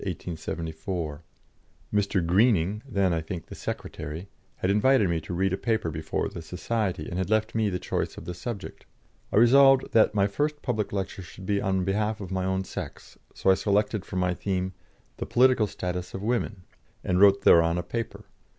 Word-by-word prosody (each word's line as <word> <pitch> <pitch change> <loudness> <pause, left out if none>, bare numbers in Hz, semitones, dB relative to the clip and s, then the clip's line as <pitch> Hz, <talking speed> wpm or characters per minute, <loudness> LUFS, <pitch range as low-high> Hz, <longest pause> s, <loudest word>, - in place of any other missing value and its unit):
Mr. 100 -3 +1
Greening 100 +1 +3
then, 100 -6 +2
I 80 - 0
think, 85 +1 -6
the - - -10
secretary 80 +5 -6 0.3
had 95 - 0
invited 105 +1 +4
me 85 -2 0
to 80 - -9
read 95 +1 +1
a - - 0
paper 110 -7 -1
before 80 0 -2
the - - -7
society, 90 0 -2
and 90 - -3
had 95 - -2
left 110 0 +1
me 110 -2 +1
the 90 - -2
choice - - -3
of - - -9
the 90 - -4
subject. 95 +3 -7 0.4
I - - -2
resolved 135 +3 +6
that 110 -1 +4
my 100 -1 +4
first 145 +9 -1
public 110 -5 -1
lecture 95 -1 -3
should 95 +1 -11
be 100 +1 +1
on 95 -2 0
behalf 105 +3 0
of 95 -2 -7
my 95 -1 -1
own 95 0 0
sex, - - -8 0.2
so 95 - +3
I - - +7
selected 105 +1 +1
for 100 - -9
my 90 -1 +1
theme, 95 0 -2 0.4
"The - - -4
Political 125 -3 +4
Status 90 -1 -4
of 95 - -5
Women," 110 -4 -1 0.4
and 90 0 +1
wrote 100 -1 +6
thereon 85 -1 +5
a 90 - -2
paper. 115 +5 -5
95 Hz, 185 wpm, -27 LUFS, 90-110 Hz, 0.4 s, I